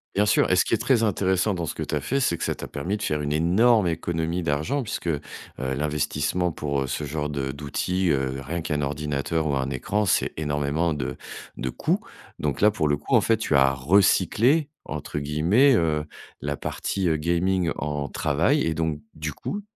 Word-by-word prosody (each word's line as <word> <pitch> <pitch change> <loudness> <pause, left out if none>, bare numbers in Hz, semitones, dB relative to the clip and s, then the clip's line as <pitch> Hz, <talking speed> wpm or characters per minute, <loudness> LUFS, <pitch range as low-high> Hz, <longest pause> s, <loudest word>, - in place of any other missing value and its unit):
Bien 105 +1 +3
sûr 105 - +3
et - - +4
ce - - +4
qui - - -1
est - - +4
très 120 -4 +2
intéressant 95 0 +1
dans 85 -3 -3
ce - - -4
que - - -3
tu - - -5
as 75 - 0
fait, 135 - 0
c'est 85 -10 +1
que - - -5
ça - - -1
t'a - - -7
permis 90 +9 -3
de 105 - -6
faire 75 -1 0
une 75 0 -2
énorme 95 +7 +4
économie 85 +1 -1
d'argent 80 - 0
puisque 110 -6 -5
heu, 75 -3 0 0.4
l'investissement 75 +5 -1
pour, 70 -3 -2
heu, 65 - -2
ce 70 +3 -3
genre 75 +1 -3
de 70 -2 -2
d'outils, 85 +6 -1
heu, 65 -1 0
rien 85 +5 -4
qu'un 75 -2 -2
ordinateur 75 +2 -1
ou 70 -2 +1
un 65 0 -1
écran, 105 +8 -1
c'est - - +2
énormément 75 +2 0
de 65 -4 -3 0.4
de 65 - -2
coûts, - - 0 0.4
donc 75 -2 -1
là, 105 0 +6
pour 80 -8 0
le 75 -1 +2
coup, 75 - -5
en - - +6
fait, 115 -1 +2
tu 80 -9 0
as 65 0 +5
«recyclé» 100 - +3 0.2
entre 75 -1 -4
guillemets, 85 - +3
heu, 75 -4 +1 0.4
la 70 -1 -2
partie, 95 -3 -2
heu, 80 -1 +2
gaming 85 +2 +1
en 75 -2 -3
travail - - +1
et 80 - 0
donc 80 -1 -1
du 75 -1 -4
coup, 205 - -5
80 Hz, 210 wpm, -25 LUFS, 75-95 Hz, 0.4 s, là